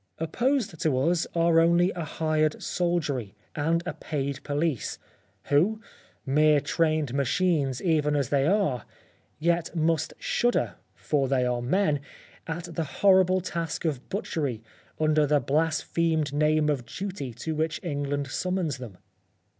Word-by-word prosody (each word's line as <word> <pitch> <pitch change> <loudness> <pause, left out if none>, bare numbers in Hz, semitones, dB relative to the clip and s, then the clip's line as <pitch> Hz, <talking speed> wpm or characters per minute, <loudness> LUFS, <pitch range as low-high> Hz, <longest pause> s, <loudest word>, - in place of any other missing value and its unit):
Opposed 225 - 0
to 155 -6 +1
us 175 -1 +1
are 165 -1 +4
only 170 +2 +4
a 175 - -4
hired 155 0 0
soldiery, 150 - -1 0.2
and 165 +3 +1
a 180 - -3
paid 140 -2 -4
police, 145 -2 -1 0.5
who 180 +10 +2 0.5
mere 150 +2 +4
trained 155 -3 0
machines 140 -1 +1
even 150 -4 +2
as 140 -3 0
they 140 0 +2
are, 180 - +1 0.5
yet 170 +2 0
must 160 -1 0
shudder 240 0 0 0.2
(for 140 -3 0
they 130 -1 +1
are 125 -1 0
men) 150 +3 +1 0.5
at 165 +1 -4
the 165 - -1 0.2
horrible 185 -1 +5
task 170 -2 -4
of 145 -5 -2
butchery, 145 - -3 0.4
under 155 -1 +3
the 150 0 +3
blasphemed 155 +1 0
name 155 +1 +2
of 135 -6 -1
duty 190 -9 -5
to 160 - -4
which 155 +1 -1
England 145 -3 -2
summons 170 0 -2
them. 115 -8 -9
155 Hz, 135 wpm, -27 LUFS, 145-170 Hz, 0.5 s, horrible